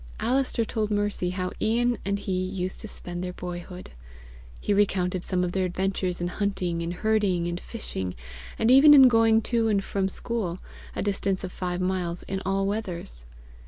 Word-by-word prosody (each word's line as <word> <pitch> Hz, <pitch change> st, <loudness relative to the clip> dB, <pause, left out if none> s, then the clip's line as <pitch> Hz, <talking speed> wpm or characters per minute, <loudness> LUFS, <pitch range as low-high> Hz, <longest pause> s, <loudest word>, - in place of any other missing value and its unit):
Alister 250 Hz, -1 st, +1 dB
told 215 Hz, -1 st, -1 dB
Mercy 205 Hz, -3 st, 0 dB
how 185 Hz, 0 st, -3 dB
Ian 240 Hz, +2 st, +2 dB
and 200 Hz, 0 st, 0 dB
he 200 Hz, -1 st, -5 dB
used 185 Hz, 0 st, -2 dB
to 220 Hz, -, -6 dB
spend 175 Hz, -3 st, -6 dB
their 180 Hz, 0 st, -4 dB
boyhood. 180 Hz, -, -7 dB, 0.7 s
He 205 Hz, -, 0 dB
recounted 185 Hz, -3 st, +1 dB
some 180 Hz, -1 st, 0 dB
of 180 Hz, -, -1 dB
their 190 Hz, +1 st, 0 dB
adventures 185 Hz, 0 st, -1 dB
in 175 Hz, -, -1 dB
hunting 180 Hz, -3 st, -1 dB
and 170 Hz, 0 st, -2 dB
herding 195 Hz, -3 st, +1 dB
and 175 Hz, 0 st, -3 dB
fishing, 95 Hz, -, -5 dB, 0.4 s
and 225 Hz, +2 st, +3 dB
even 290 Hz, +3 st, +9 dB
in 265 Hz, -2 st, +9 dB
going 225 Hz, -2 st, +4 dB
to 230 Hz, -1 st, +1 dB
and 200 Hz, -3 st, +2 dB
from 195 Hz, -1 st, -1 dB
school, 195 Hz, -5 st, -3 dB, 0.4 s
a -, -, -2 dB
distance 195 Hz, -1 st, -1 dB
of 185 Hz, -, -4 dB
five 180 Hz, -1 st, -3 dB
miles, 180 Hz, -2 st, -2 dB
in 190 Hz, 0 st, -4 dB
all 195 Hz, 0 st, +1 dB
weathers. 180 Hz, -, -4 dB
190 Hz, 175 wpm, -26 LUFS, 180-215 Hz, 0.7 s, even